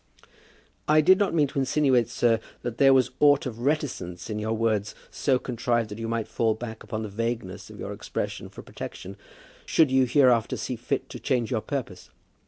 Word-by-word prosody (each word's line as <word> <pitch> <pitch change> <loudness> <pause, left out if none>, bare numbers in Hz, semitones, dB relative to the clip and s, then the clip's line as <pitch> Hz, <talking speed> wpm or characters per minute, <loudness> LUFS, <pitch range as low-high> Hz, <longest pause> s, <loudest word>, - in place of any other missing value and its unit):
"I 155 +1 +5
did 185 +4 +5
not 200 -4 +1
mean 150 -3 +3
to 140 - -3
insinuate, 130 -3 +2
sir, 120 -2 +2 0.2
that 120 -1 -5
there 135 -1 +7
was 130 -1 +4
aught 145 -1 +5
of 120 -3 -5
reticence 120 - -2
in 105 - -3
your 110 +1 -1
words, 110 -2 0 0.2
so 135 -3 +1
contrived 120 -2 -1
that 105 +2 -7
you 115 - -3
might 115 -1 -2
fall 110 -2 0
back 110 -1 -7
upon 110 -1 -5
the - - -4
vagueness 110 -2 -4
of - - -12
your - - -5
expression - - -5
for - - -11
protection, - - -8 0.5
should 155 -5 +3
you 130 0 +4
hereafter 125 -4 +3
see - - -3
fit - - -3
to - - -8
change 120 -2 -1
your 115 -3 0
purpose. 125 -10 -5
120 Hz, 190 wpm, -26 LUFS, 110-135 Hz, 0.5 s, there